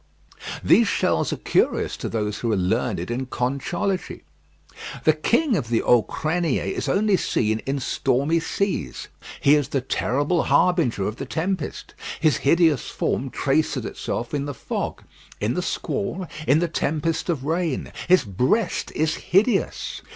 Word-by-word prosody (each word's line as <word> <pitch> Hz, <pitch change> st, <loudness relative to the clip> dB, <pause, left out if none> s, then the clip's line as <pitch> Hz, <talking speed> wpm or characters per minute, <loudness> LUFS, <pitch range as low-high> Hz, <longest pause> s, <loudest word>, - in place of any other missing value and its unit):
These -, -, +5 dB
shells -, -, +1 dB
are -, -, -2 dB
curious -, -, +1 dB
to -, -, -4 dB
those 105 Hz, -2 st, -2 dB
who 115 Hz, -, -1 dB
are 105 Hz, -, +2 dB
learned 90 Hz, +1 st, -1 dB
in 130 Hz, +2 st, -2 dB
conchology. 140 Hz, +10 st, -2 dB, 0.8 s
The 155 Hz, -, +5 dB
King 235 Hz, -, +2 dB
of 130 Hz, -, -2 dB
the 115 Hz, -1 st, +1 dB
Auxcriniers 155 Hz, -, +1 dB
is -, -, -2 dB
only 200 Hz, 0 st, +3 dB
seen 110 Hz, -8 st, 0 dB
in 140 Hz, +1 st, 0 dB
stormy 140 Hz, +5 st, +1 dB
seas. 160 Hz, -, -2 dB, 0.3 s
He 140 Hz, -, +5 dB
is 145 Hz, -3 st, +3 dB
the 135 Hz, -, 0 dB
terrible 145 Hz, +5 st, 0 dB
harbinger 165 Hz, -, +2 dB
of 110 Hz, -, -4 dB
the 135 Hz, -, -5 dB
tempest. 170 Hz, +2 st, -3 dB, 0.3 s
His 155 Hz, -2 st, +3 dB
hideous 160 Hz, -2 st, +3 dB
form -, -, -1 dB
traces -, -, 0 dB
itself 120 Hz, +4 st, -4 dB
in 140 Hz, -1 st, -1 dB
the 145 Hz, -1 st, -5 dB
fog, -, -, -4 dB, 0.4 s
in -, -, 0 dB
the -, -, -1 dB
squall, 180 Hz, -, -3 dB, 0.2 s
in 140 Hz, -, +5 dB
the 170 Hz, +2 st, +1 dB
tempest 160 Hz, +1 st, -1 dB
of 145 Hz, -6 st, -1 dB
rain. 165 Hz, -2 st, -1 dB, 0.2 s
His 180 Hz, -3 st, +5 dB
breast 125 Hz, -, 0 dB
is 155 Hz, 0 st, +1 dB
hideous. 205 Hz, +7 st, +1 dB
150 Hz, 150 wpm, -23 LUFS, 125-175 Hz, 0.8 s, These